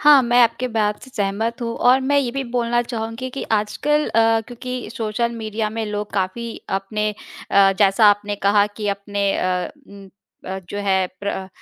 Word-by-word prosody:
हाँ, 295 -3 +7
मैं 240 +1 +3
आपके 240 +2 +1
बात 210 -2 -1
से 260 - -12
सहमत 220 +3 -1
हूँ 230 0 -2
और 255 +2 +4
मैं 285 +2 +2
ये 255 -4 0
भी 275 +2 -3
बोलना 240 -1 0
चाहूँगी 230 +1 -5
कि 270 - -5
आजकल 295 +8 +1
अ, 225 0 +3
क्योंकि 250 +1 -6
सोशल 230 +1 -1
मीडिया 215 -1 -3
में 225 0 -3
लोग 210 0 -4
काफ़ी 200 +5 -2 0.2
अपने 210 +2 -1 0.4
अ, 195 -1 +5
जैसा 205 +1 +5
आपने 205 0 -1
कहा 205 0 +5
कि 210 -2 -2
अपने 200 0 -1
अ 180 0 -1 0.2
उम 200 -1 -13 0.4
अ, 190 +1 -4
जो 205 - -5
है 190 -2 +1
प्र 200 - -3
अ 190 -1 -4
220 Hz, 185 wpm, -21 LUFS, 200-240 Hz, 0.4 s, हाँ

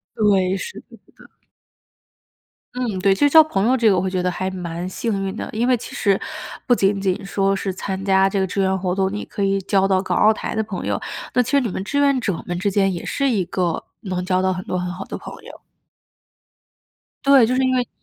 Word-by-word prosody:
对， 195 -3 +2
是 470 - -7
的 - - -27
是 - - -13 0.3
的。 - - -21 1.4
嗯， 240 -6 -2
对， 195 +1 +4
就 290 +9 +3
交 315 +2 +8
朋 200 -9 0
友 260 - +4
这 230 -4 +4
个 190 - +3
我 - - +2
会 190 - -1
觉 185 -1 -1
得 180 - +1
还 185 +1 -3
蛮 175 -1 -5
幸 200 +1 -2
运 195 +2 -4
的。 - - -4
因 230 +3 0
为 255 - +4
其 235 - -9
实 200 -2 +2 0.5
不 245 - +5
仅 195 -2 +1
仅 190 -2 -1
说 195 0 0
是 195 0 -2
参 190 0 -4
加 195 0 +3
这 195 - 0
个 190 - +1
志 195 +1 -1
愿 190 0 +1
活 180 -1 -1
动， 190 0 0
你 210 - -4
可 200 - -5
以 195 0 +1
交 195 0 +2
到 190 -1 +2
港 185 - -2
澳 215 - +5
台 - - -5
的 220 - 0
朋 200 -3 -5
友， - - 0 0.4
那 250 - +4
其 240 - -5
实 280 -1 +4
你 245 - -1
们 190 0 -4
志 285 +7 -2
愿 280 -2 +3
者 200 -8 -2
们 175 -1 -3
之 200 +2 0
间 195 0 +2
也 170 - -6
是 275 -1 0
一 210 -8 +1
个 175 -1 -2 0.2
能 185 -4 -3
交 185 0 +1
到 190 0 +1
很 185 0 -6
多 180 - -2
很 180 0 -3
好 180 - -6
的 - - -6
朋 - - -9
友。 - - -12 1.6
对， 275 -4 +6
就 250 - 0
是 260 - +2
因 260 0 +2
为 250 -1 0
195 Hz, 265 characters per minute, -21 LUFS, 185-225 Hz, 1.6 s, 交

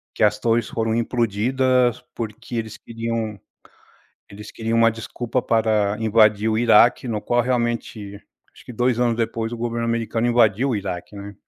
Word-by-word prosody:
Que - - -3
as 105 0 +2
torres 115 0 0
foram 115 -1 -1
implodidas, 120 +2 +1
porque 115 +1 -6
eles 110 -1 -4
queriam 115 -2 -4 0.9
eles 105 +1 -11
queriam 115 0 -1
uma 115 -1 +4
desculpa 120 +2 -4
para 110 -2 +1
invadir 110 -1 +3
o 110 - +1
Iraque, 120 +2 +4
no 105 -2 -2
qual, 120 +2 +1
realmente, 120 -4 -2 0.4
acho - - -17
que 125 - -9
2 125 +1 0
anos 120 -2 +1
depois 115 0 -2
o - - -4
governo 115 0 -3
americano 115 0 -1
invadiu 120 +2 +3
o 120 - 0
Iraque, 95 0 -6
né? 100 0 -9
115 Hz, 160 wpm, -22 LUFS, 110-120 Hz, 0.9 s, uma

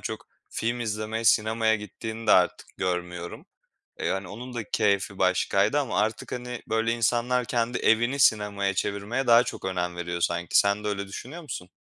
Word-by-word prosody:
çok - - -6 0.2
film 120 +2 -2
izlemeye 110 0 -3
sinemaya 110 0 +3
gittiğini 110 +2 -7
de - - +6
artık - - +3
görmüyorum. 90 -1 -4 0.5
E, - - -2
hani, 95 -1 -2
onun 125 +5 -8
da 115 -3 -3
keyfi 100 -1 +1
başkaydı 100 +7 +2
ama 110 -9 -2
artık, 110 +1 -2
hani, 125 -1 -5
böyle, 115 +1 +1
insanlar 120 +2 +1
kendi 120 +2 -1
evini 120 +5 +2
sinemaya 105 -5 +2
çevirmeye 105 +7 -2
daha 120 0 +7
çok - - -6
önem 90 -2 -2
veriyor 85 0 -4
sanki. 85 0 +1
Sen 100 +1 +2
de - - -1
öyle 100 -1 -3
düşünüyor 145 - -8
musun? 90 - -7
110 Hz, 170 wpm, -26 LUFS, 100-120 Hz, 0.5 s, daha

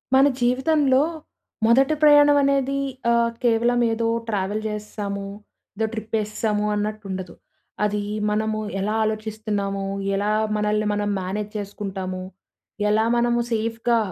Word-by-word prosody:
మన 270 +2 +6
జీవితంలో 265 +2 +3 0.6
మొదట 265 +5 +4
ప్రయాణం 290 -1 +7
అనేది 275 0 +1 0.3
ఆ! - - +4 0.3
కేవలం 240 +1 +3
ఏదో 225 0 0 0.2
ట్రావెల్ 205 0 -1
చేసేసాము, 210 -1 -4 0.5
ఏదో 220 +2 0
ట్రిప్ 220 0 -7
వేసేసాము 210 0 -1
అన్నట్టు 215 +1 -3
ఉండదు. 185 -2 -5 0.5
అది 210 0 0 0.3
మనము 215 +1 0 0.2
ఎలా 210 +3 -1
ఆలోచిస్తున్నాము, 215 -2 -2 0.3
ఎలా 205 +2 0 0.2
మనల్ని 210 0 0
మనం 205 0 -1
మేనేజ్ 205 +3 -4
చేసుకుంటాము, 195 -2 -5 0.7
ఎలా 215 +1 +3
మనము 240 0 +2
సేఫ్‌గా 230 +1 0
215 Hz, 115 wpm, -23 LUFS, 205-235 Hz, 0.7 s, ప్రయాణం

